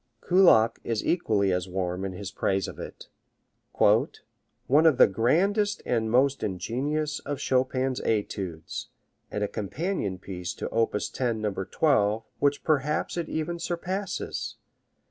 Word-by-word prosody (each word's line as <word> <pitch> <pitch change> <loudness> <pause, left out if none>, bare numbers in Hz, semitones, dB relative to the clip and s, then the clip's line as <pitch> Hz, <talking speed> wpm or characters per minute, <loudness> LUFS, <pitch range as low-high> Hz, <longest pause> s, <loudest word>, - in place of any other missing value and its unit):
Kullak 145 -12 +5
is 115 -2 -2
equally 105 - +2
as 90 0 -1
warm 90 0 -2
in 95 - -4
his 95 +1 -6
praise 95 -2 0
of - - -9
it: - - -9 0.7
One 150 +5 +1
of 150 -6 +4
the - - +9
grandest 195 - +1
and 110 -2 0
most 135 +4 +3
ingenious 135 - -2
of 145 - -4
Chopin's 130 0 0
etudes, 95 -6 -3 0.4
and 105 - -2
a - - +1
companion 105 - -3
piece 90 -1 -6
to - - -4
op. 115 -2 +1 0.2
10, 120 -4 -1
No. 105 -2 -1
12, 105 - +1 0.2
which 145 0 +1
perhaps 150 0 0
it 170 -1 -3
even 165 +2 -3
surpasses. 180 +3 -3
120 Hz, 135 wpm, -27 LUFS, 100-155 Hz, 0.7 s, the